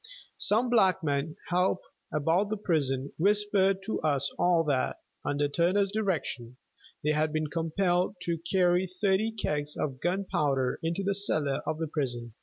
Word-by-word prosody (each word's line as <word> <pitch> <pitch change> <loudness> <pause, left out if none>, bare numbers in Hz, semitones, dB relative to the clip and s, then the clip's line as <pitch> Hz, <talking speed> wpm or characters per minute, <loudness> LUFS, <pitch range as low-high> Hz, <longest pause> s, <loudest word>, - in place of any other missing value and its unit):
Some 235 +4 +3
negro 160 -9 +2
help 180 +1 +1 0.3
about 165 +7 +1
the 215 - -2
prison 140 -8 0
whispered 195 0 +2
to 220 - -3
us 140 -3 0
all 175 -2 +3
that, 140 -4 0 0.3
under 145 0 0
Turner's 185 +6 +1
direction, 165 - -2 0.5
they 150 - +2
had 155 +1 +1
been 155 -1 -2
compelled 175 +3 0
to 170 -1 -2
carry 180 +1 +2
thirty 190 +4 0
kegs 150 -9 -2
of 130 -3 -3
gunpowder 150 -8 0
into 165 +4 -2
the 200 +1 +1
cellar 155 -8 0
of 155 - -1
the 160 - -2
prison. 120 -7 -3
170 Hz, 145 wpm, -29 LUFS, 145-195 Hz, 0.5 s, Some